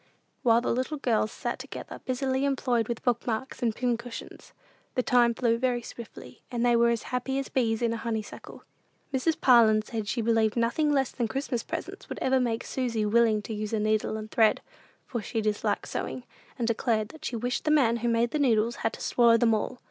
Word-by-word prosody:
While 235 -1 +4
the - - 0
little 255 +5 -2
girls 225 -5 +1
sat - - -4
together - - -8
busily 260 +1 -1
employed 250 -5 +1
with 235 -2 -4
book 245 -2 0
marks 245 +4 -3
and 230 -3 0
pin 245 -2 0
cushions, 235 0 -9 0.4
the 255 - +1
time 240 -1 +3
flew 230 -1 +1
very 245 -1 0
swiftly, 235 0 -10
and 240 -1 -1
they 240 -1 +4
were 235 0 +4
as 235 -2 0
happy 260 +2 -1
as 275 - -3
bees 230 -3 0
in 230 -1 +1
a - - -3
honeysuckle. 220 -2 -6 0.5
Mrs. 290 +5 +1
Parlin 225 -4 +5
said 220 -1 -5
she 240 - -1
believed 225 0 +2
nothing 240 +6 +1
less 270 -3 +1
than 235 - -2
Christmas 265 -1 -2
presents - - -7
would - - -5
ever 260 0 +2
make 235 -2 -1
Susy 235 -5 -1
willing 220 -1 +3
to 225 - -5
use 215 +1 -4
a 220 - +1
needle 215 0 0
and 215 0 -8
thread; 220 -2 +3 0.4
for 240 -3 -4
she 225 - -3
disliked 215 -1 -1
sewing, 255 - -4 0.3
and 235 -3 -1
declared 225 -2 0
she 285 -6 -3
wished 245 +2 -2
the - - +2
man 260 -7 +4
who 235 +1 -2
made 235 +1 +2
the 305 - -1
needles 235 -4 +2
had 225 - -1
to - - -9
swallow 235 -1 +4
them 230 -1 +3
all. 215 +3 -2
235 Hz, 210 wpm, -27 LUFS, 225-250 Hz, 0.5 s, Parlin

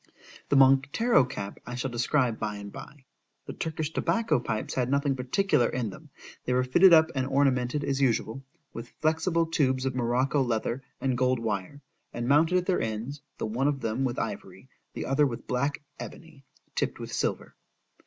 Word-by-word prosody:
The - - +3
Montero 135 - +5
cap 100 -5 -6
I 125 - -7
shall 125 +1 -3
describe 120 0 +1
by 105 -1 -3
and 100 0 -8
bye.—The 135 0 -13
Turkish 160 -1 -4
tobacco 230 - +1
pipes 110 -3 -3
had 125 -1 0
nothing 140 0 +1
particular 130 - +1
in 120 -5 -2
them, - - -13 0.3
they 125 - -1
were 125 0 +2
fitted 175 +9 +6
up 160 0 +6
and 130 -1 -1
ornamented 135 0 +1
as 140 -1 -1
usual, 125 0 0 0.3
with 115 +1 -8
flexible 165 +2 +1
tubes 135 -5 0
of 135 - 0
Morocco 130 +3 +1
leather 120 +1 -1 0.2
and 130 -2 0
gold 130 0 +2
wire, 115 +4 -4 0.3
and 120 0 -4
mounted 160 +6 +4
at 180 - 0
their 185 -1 +1
ends, 115 +6 -4 0.2
the - - -3
one 120 +6 0
of 140 -2 -1
them 115 +4 -1
with 125 -2 -1
ivory,—the - - -7
other 140 +2 +3
with 120 -3 -6
black 140 +4 -1 0.2
ebony, 155 -5 -10 0.3
tipp'd - - -1
with - - -7
silver. - - -2
135 Hz, 175 wpm, -27 LUFS, 120-145 Hz, 0.3 s, fitted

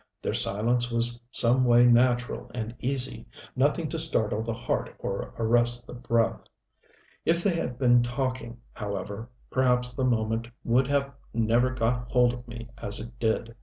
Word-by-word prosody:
Their - - -3
silence 120 +4 +1
was 120 +1 +1
some 125 +1 +3
way 120 0 +5
natural 120 0 +2
and 115 -1 -4
easy, 130 0 -1 0.3
nothing 145 +5 +1
to 165 - -3
startle 110 -9 +4
the 115 +1 -3
heart 120 +1 -3
or - - -5
arrest 120 +1 +3
the - - -11
breath. 115 -2 0 0.8
If 170 +1 +1
they 200 - +2
had 125 -7 -3
been 120 -2 +4
talking, 120 -1 -3 0.2
however, 100 +2 -6 0.2
perhaps 125 -1 +1
the 130 - -3
moment 115 -1 0 0.2
would 125 +2 +2
have 140 -1 0 0.2
never 115 +2 +2
got 125 -1 -1
hold 125 -1 +3
of 125 0 -10
me 120 -1 -9
as 100 - 0
it 120 +1 -10
did. 115 0 -1
120 Hz, 160 wpm, -26 LUFS, 115-125 Hz, 0.8 s, way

